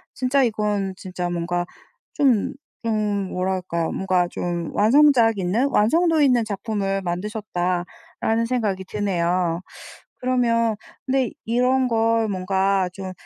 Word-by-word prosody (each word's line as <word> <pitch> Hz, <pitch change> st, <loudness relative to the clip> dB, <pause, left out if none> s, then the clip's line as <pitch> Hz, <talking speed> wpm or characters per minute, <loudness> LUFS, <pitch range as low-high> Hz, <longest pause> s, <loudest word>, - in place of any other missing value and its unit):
진짜 260 Hz, +2 st, +2 dB
이건 210 Hz, -4 st, -1 dB
진짜 180 Hz, -2 st, -5 dB
뭔가 175 Hz, 0 st, -2 dB, 0.5 s
좀 260 Hz, -8 st, +2 dB, 0.3 s
좀 210 Hz, -3 st, 0 dB
뭐랄까요. 180 Hz, -2 st, -2 dB
뭔가 185 Hz, -2 st, +1 dB
좀 175 Hz, -1 st, -4 dB
완성작 235 Hz, -1 st, +5 dB
있는 210 Hz, +10 st, +1 dB
'완성도 320 Hz, +8 st, +3 dB
있는 250 Hz, -5 st, +4 dB
작품을 200 Hz, -2 st, -2 dB
만드셨다.'라는 185 Hz, +3 st, -2 dB
생각이 215 Hz, -6 st, -1 dB
드네요. 180 Hz, -3 st, -1 dB, 0.6 s
그러면 235 Hz, -3 st, +1 dB, 0.3 s
근데 265 Hz, -1 st, +1 dB
이런 250 Hz, +3 st, +2 dB
걸 225 Hz, -1 st, +2 dB
뭔가 190 Hz, 0 st, +1 dB
좀 190 Hz, -1 st, -7 dB
205 Hz, 240 characters per minute, -22 LUFS, 185-230 Hz, 0.6 s, 완성작